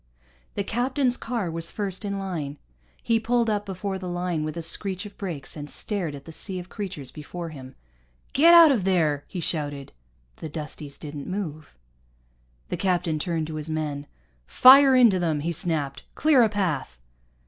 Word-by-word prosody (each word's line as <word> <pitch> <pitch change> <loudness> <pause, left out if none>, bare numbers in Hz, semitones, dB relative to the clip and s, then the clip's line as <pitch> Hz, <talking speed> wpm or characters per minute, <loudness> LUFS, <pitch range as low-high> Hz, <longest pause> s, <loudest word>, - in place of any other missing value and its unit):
The 200 - -1
captain's 250 +4 +1
car 230 -9 -3
was 165 0 -4
first 200 -2 -3
in 200 -1 -2
line. 165 -7 -4 0.5
He 230 -1 +2
pulled 235 0 +1
up 205 -1 -2
before 190 0 -4
the 185 -1 -5
line 175 -2 -2
with 155 +1 -4
a 170 - -3
screech 190 +3 -2
of 205 - -10
brakes, 170 -9 -6
and 150 -1 -7
stared 180 -9 -3
at 140 - -11
the 165 - -9
sea 185 +3 -4
of 180 0 -7
creatures 185 -10 -6
before 165 +3 -7
him. 130 -4 -11 0.6
"Get 335 +5 +7
out 335 -3 +9
of 230 -8 +1
there!" 160 -6 +1
he 185 - -6
shouted. 145 -4 -2 0.5
The 160 - -7
Dusties 150 -2 -7
didn't 145 -2 -7
move. 160 -6 -5 0.9
The - - -2
captain 175 -4 0
turned 165 -1 -1
to 155 0 -6
his 155 +1 -4
men. 150 -2 -3 0.4
"Fire 270 +1 +8
into 230 -7 +6
them," 160 -4 0
he 170 +3 -1
snapped. 150 -4 -2
"Clear 305 -5 +4
a 225 - +4
path." 170 - -2
175 Hz, 175 wpm, -25 LUFS, 155-205 Hz, 0.9 s, out